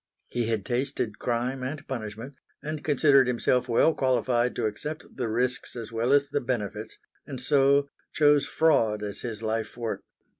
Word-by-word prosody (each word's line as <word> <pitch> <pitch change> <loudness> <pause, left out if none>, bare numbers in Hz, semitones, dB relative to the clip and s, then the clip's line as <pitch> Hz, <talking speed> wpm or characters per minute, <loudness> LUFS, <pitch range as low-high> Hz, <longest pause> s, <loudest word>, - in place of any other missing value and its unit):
He 120 -2 -1
had 110 -4 -1
tasted 120 -4 -2
crime 125 +2 -1
and 145 +4 -5
punishment, 115 +1 -6 0.3
and 155 0 -4
considered 140 -3 +4
himself 125 0 +1
well 140 +7 +4
qualified 125 -2 +1
to 120 - -1
accept 150 +9 -4
the 125 -3 -2
risks 125 +4 -1
as 115 -2 -7
well 115 +3 0
as 140 0 +4
the 145 - -1
benefits; 110 -3 -4 0.3
and 135 -4 -6
so 140 +1 +3 0.2
chose 145 -1 +4
fraud 115 -10 +2
as 105 -1 -5
his 115 -2 -5
life 110 +1 -2
work. 115 -2 -3
125 Hz, 160 wpm, -27 LUFS, 115-140 Hz, 0.3 s, considered